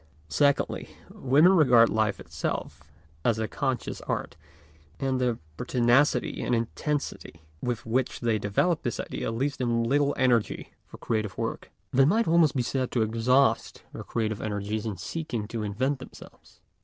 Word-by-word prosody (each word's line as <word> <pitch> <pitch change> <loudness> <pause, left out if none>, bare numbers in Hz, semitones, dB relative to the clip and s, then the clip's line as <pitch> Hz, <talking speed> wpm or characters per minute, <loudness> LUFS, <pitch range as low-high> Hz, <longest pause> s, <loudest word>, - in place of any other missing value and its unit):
Secondly, 140 - +1 0.2
women 145 +7 +4
regard 125 -9 +6
life 110 -4 0
itself - - -4 0.4
as 115 -2 +2
a 110 0 -1
conscious 130 -2 -3
art, - - -3 0.6
and 130 -1 0
the 120 -2 +1 0.2
pertinacity 125 - +2
and 125 - +1
intensity 115 - -3 0.2
with 120 -3 -3
which 125 +3 -1
they 115 -3 +1
develop 150 - +1
this 120 - -3
idea - - -3
leaves 135 +5 -1
them 120 -2 0
little 140 +4 +2
energy 120 -4 +1
for - - -12
creative 110 -3 -2
work. - - -4 0.2
They 135 +1 +5
might 220 +10 +2
almost 165 -3 +4
be 125 - +1
said 130 +1 -1
to 120 - +2
exhaust 115 +5 +1
their - - -6
creative 110 -2 -2
energies 105 +1 -3
in 105 -4 -4
seeking 115 - -4
to 115 - -4
invent 130 +7 -1
themselves. 130 - -14
120 Hz, 150 wpm, -27 LUFS, 110-140 Hz, 0.6 s, regard